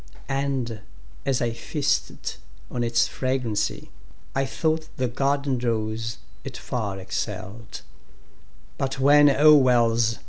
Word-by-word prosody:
And, 135 -5 -1 0.5
as 130 -2 +1
I 115 -1 0
feasted 145 +5 -2 0.3
on 120 - -1
its 115 0 +2
fragrancy,I 130 +1 -3
thought 160 +3 -1
the 130 - +1
garden 140 +1 0
rose 110 -1 -2 0.3
it - - -7
far 105 -5 -3
excell'd:But 110 +6 -7
when, 145 +2 +7
O 150 +2 +7
Wells! 120 -4 +4
125 Hz, 100 wpm, -25 LUFS, 115-140 Hz, 0.5 s, when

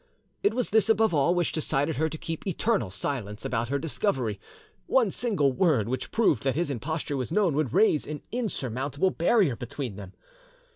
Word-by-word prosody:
It 410 - +2
was 250 -2 -1
this 220 -1 +3
above 220 -2 +3
all 155 +4 +3
which 175 -2 +1
decided 145 -1 -1
her 160 +2 +1
to 160 - -6
keep 165 +4 -5
eternal 195 - 0
silence 105 0 -4
about 120 -1 -1
her 140 - +1
discovery; 135 - -1 0.5
one 235 -7 +3
single 185 - +1
word 135 - +2
which 130 +2 -3
proved 185 - +2
that 135 -1 0
his 165 -2 0
imposture 145 +3 -3
was 125 -4 -3
known 195 -6 +2
would 145 -4 0
raise 160 -9 +3
an 150 0 -6
insurmountable 145 - -1
barrier 175 - +2
between 120 -2 -5
them. 95 -2 -9
150 Hz, 180 wpm, -27 LUFS, 130-190 Hz, 0.5 s, this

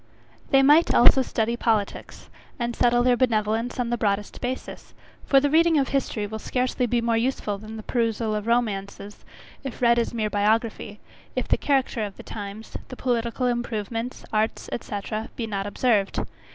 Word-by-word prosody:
They 270 0 +5
might, 295 +5 +5
also 255 +2 +7
study 235 -2 -1
politics, 220 -4 -2 0.3
and 240 -2 -2
settle 240 0 +3
their 250 0 +4
benevolence 230 0 0
on 240 -1 -1
the 240 - -1
broadest 205 -1 -1
basis; 255 +1 -5 0.3
for 275 - +6
the 285 +1 0
reading 330 0 +4
of 275 -2 +1
history 255 -6 -1
will 220 +1 -6
scarcely 250 +1 -1
be 240 0 +1
more 230 -1 +1
useful 225 -4 -1
than 215 +1 -9
the 215 - -8
perusal 225 -2 0
of 210 +1 -3
romances, 205 -3 -2 0.4
if 270 -3 -6
read 235 -1 +4
as 235 - -1
mere 215 -3 -2
biography; 210 0 0 0.4
if - - -1
the - - +3
character 265 -5 0
of 200 -2 -6
the - - -10
times, 205 +1 -8
the 255 - -8
political 240 0 -1
improvements, 235 -1 -3
arts, 215 +1 0
etc. 215 0 -4
be 235 - -3
not 200 -2 -3
observed. 205 -2 +1
230 Hz, 170 wpm, -25 LUFS, 215-250 Hz, 0.4 s, also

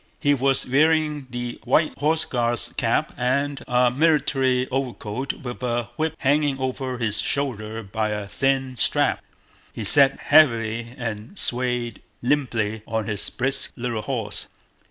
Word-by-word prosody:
He 145 -2 +3
was 135 0 +1
wearing 150 +1 +2
the 120 -1 -5
white 150 +6 +2
Horse 155 +2 +2
Guard's 120 -2 -1
cap - - 0
and 140 +3 0
a 125 -1 +3
military 135 -3 +2
overcoat 130 -1 -3
with 125 -1 -8
a 120 -1 -1
whip 160 +2 -1
hanging 145 0 +2
over 130 -1 -3
his 105 -3 +2
shoulder 115 -5 -2
by 110 +2 -2
a 105 -1 -3
thin 135 +3 0
strap. - - +2 0.5
He 110 - -6
sat 135 +6 +5
heavily 115 -5 +3
and 115 - -5
swayed 125 - -1 0.2
limply 115 -6 0
on 110 -1 -1
his 105 -3 -2
brisk 135 +2 -1
little 120 -3 -3
horse. 110 -5 -4
125 Hz, 135 wpm, -23 LUFS, 115-140 Hz, 0.5 s, sat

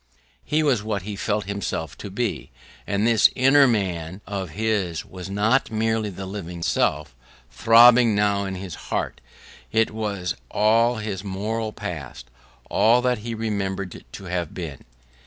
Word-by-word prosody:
He 155 +1 +1
was 135 -8 +2
what 105 -3 -3
he 105 +1 -5
felt 105 +1 -1
himself 100 -5 -4
to 100 - -7
be: 115 +3 -3 0.4
and 100 +2 0
this 115 -1 +5
inner 135 +2 +6
man 95 -5 -2
of 95 -3 -4
his 100 -3 -1
was 90 0 -9
not 110 +7 +2
merely 110 -1 0
the 95 0 -7
living 90 -3 -6
self, 75 -5 0 0.4
throbbing 115 0 +6
now 100 -1 +1
in 95 -1 -4
his 95 -2 -7 0.2
heart; - - -2 0.5
it 110 0 +2
was 100 -4 -3
all 115 +3 +3
his 105 -3 -4
moral 105 +3 -3
past, 75 - -7 0.4
all 120 +3 +3
that 125 -2 +1
he 115 +2 -5
remembered 100 -4 -3
to - - -8
have 90 -3 -3
been. 80 -7 -7
105 Hz, 150 wpm, -23 LUFS, 95-110 Hz, 0.5 s, inner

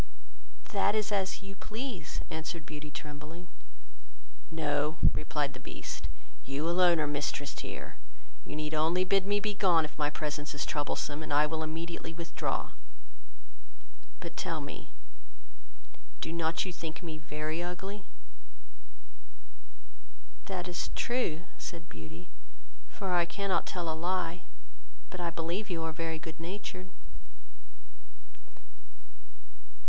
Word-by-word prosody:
"That 200 +1 +5
is 215 -1 +2
as 195 0 +2
you 195 0 -6
please," 215 - -3
answered 160 0 -2
Beauty, 150 -1 -5
trembling. 150 +4 -6 1.0
"No, 150 -1 +2 0.2
(replied - - +1
the - - -7
Beast,) - - -4 0.4
you 140 +4 0
alone 175 -1 +7
are 155 - +4
mistress 145 0 0
here; - - -5 0.5
you - - -5
need 155 0 -1
only 165 +4 +5
bid 195 +1 +4
me 205 0 +5
be 210 0 +1
gone, 175 -5 +6
if 150 - -9
my 145 -1 +4
presence 150 0 -2
is 145 - +1
troublesome, 145 0 0
and 155 - -4
I 145 +1 +7
will 160 +1 0
immediately 165 +1 -2
withdraw: 170 0 -1 1.5
but - - -5
tell - - 0
me, - - -6 1.3
do 160 - -1
not 165 +1 +2
you 185 - -2
think 165 0 -4
me 160 -2 -3
very 155 +2 -1
ugly?" 190 +3 -3 2.4
"That 185 -2 -1
is 175 0 -1
true, 235 -10 +2 0.2
(said 165 -2 -5
Beauty,) 80 -1 -8 0.6
for 190 -2 -1
I 175 -1 +6
cannot 195 -1 +1
tell 175 -2 -1
a 160 - +2
lie; 175 +1 +1 0.7
but 185 - -5
I 170 - +2
believe 170 +5 -1
you 165 -3 0
are 160 - +1
very 165 0 -1
good 160 0 -7
natured." 185 +1 -4
165 Hz, 125 wpm, -33 LUFS, 155-185 Hz, 2.4 s, alone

